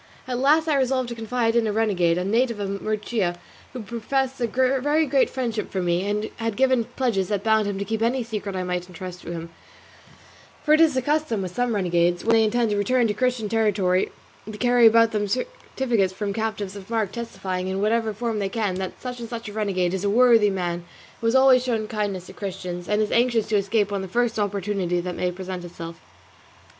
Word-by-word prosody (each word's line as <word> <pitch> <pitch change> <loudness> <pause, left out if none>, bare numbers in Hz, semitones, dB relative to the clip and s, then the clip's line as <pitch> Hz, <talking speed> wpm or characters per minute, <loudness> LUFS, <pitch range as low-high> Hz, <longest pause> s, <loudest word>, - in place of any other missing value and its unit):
At 250 -1 -2
last 305 +4 +4
I 300 -3 +2
resolved 260 -2 +1
to 235 - -5
confide 230 0 -1
in 235 -2 +3
a - - 0
renegade, 190 -6 +2
a 180 - -1
native 230 +2 +1
of 200 0 -3
Murcia, 215 -4 -1 0.4
who 250 -3 -7
professed 255 +4 -2
a 235 - +2
very 265 +6 +2
great 270 -2 +2
friendship 230 -5 -3
for 190 - -3
me, 175 +2 0
and 210 +1 -2
had 225 -2 -2
given 260 -3 +3
pledges 225 -8 0
that 205 -2 -2
bound 220 -1 +3
him 200 -1 -2
to 200 - -3
keep 220 +2 -2
any 245 +2 +1
secret 210 -3 -5
I 185 - -2
might 180 0 -3
entrust 180 0 -8
to - - -7
him; 165 0 -6 1.1
for 300 - +4
it 310 - +5
is 315 -4 +4
the 260 - 0
custom 290 -8 0
with 180 -1 -6
some 245 -2 0
renegades, 175 -2 +1
when 230 - +4
they 225 -1 +5
intend 225 +1 +1
to 205 - 0
return 240 +5 +2
to - - +1
Christian 245 -1 0
territory, 205 -4 +1 0.4
to 210 - -8
carry 245 0 +5
about 230 0 +5
them 205 -1 -1
certificates 245 - -1
from 200 +1 -3
captives 215 -2 -3
of 195 0 -10
mark 220 -4 0
testifying, 190 -6 -4
in 190 +1 -2
whatever 220 +2 +1
form 220 +1 -3
they 195 -1 -1
can, 210 -2 -1
that 190 -1 -5
such 250 -1 -6
and 230 -1 -7
such 235 -1 -6
a - - -9
renegade 190 -4 0
is 190 0 -2
a 200 - +1
worthy 230 -1 +5
man 175 -3 -2 0.4
who 230 - -1
has 230 - +2
always 260 -1 +6
shown 225 -4 -1
kindness 205 -4 -3
to 185 - -11
Christians, 180 -3 -6
and 210 +1 +2
is 210 - -3
anxious 235 -2 +2
to 215 - +1
escape 205 +1 +1
on 200 - -1
the 190 - -5
first 235 +3 0
opportunity 200 -3 -1
that 180 +1 -4
may 180 +1 -1
present 185 0 -6
itself. 170 -1 -9
215 Hz, 220 wpm, -24 LUFS, 190-240 Hz, 1.1 s, always